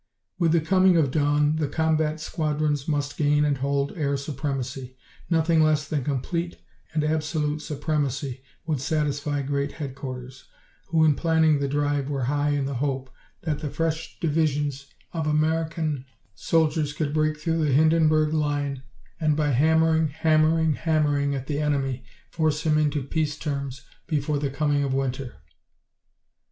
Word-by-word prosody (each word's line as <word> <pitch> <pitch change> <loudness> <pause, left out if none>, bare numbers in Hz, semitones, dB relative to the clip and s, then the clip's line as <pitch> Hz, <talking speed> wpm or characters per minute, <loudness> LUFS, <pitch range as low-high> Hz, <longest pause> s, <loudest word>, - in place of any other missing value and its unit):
With 170 -3 +3
the 165 - +4
coming 185 +2 +4
of 145 -5 +2
dawn 145 +1 +2
the 155 -2 0
combat 155 +1 0
squadrons 150 -2 -1
must 145 -2 -1
gain 150 0 +3
and 145 -2 0
hold 140 +1 -1
air 140 -4 0
supremacy. 135 -2 -4 0.3
Nothing 165 -1 +3
less 155 -2 +2
than 145 -3 -1
complete 165 +6 -2 0.3
and 155 -1 0
absolute 155 -1 -1
supremacy 140 -3 -2 0.2
would 150 -5 -1
satisfy 145 -1 -1
Great 140 +1 -2
Headquarters, 130 -3 -7 0.4
who 160 -1 +3
in 155 - +5
planning 160 -1 +3
the 140 - 0
drive 145 0 0
were 135 -3 -2
high 145 +3 +1
in 145 -2 0
the 140 - -3
hope 130 0 -2 0.3
that 150 -3 -1
the 150 -1 -4
fresh 160 +2 -3
divisions 145 -3 0 0.3
of 160 -2 -2
American 155 -2 0 0.3
soldiers 155 +1 +1
could 150 -1 -2
break 155 0 +1
through 165 +1 0
the 150 - +2
Hindenburg 155 +1 +4
Line 145 -3 -1 0.4
and 155 -2 +2
by 150 -1 +1
hammering, 160 +4 +3
hammering, 155 +1 +2
hammering 145 -3 +1
at 135 -1 -4
the 145 0 -2
enemy 135 -4 -1 0.3
force 155 -2 0
him 155 -1 +3
into 150 -2 +1
peace 145 +1 -1
terms 140 -4 -4 0.2
before 150 -2 0
the 140 -1 -1
coming 145 +1 +1
of 135 -1 -1
winter. 135 -1 -2
150 Hz, 150 wpm, -25 LUFS, 140-155 Hz, 0.4 s, in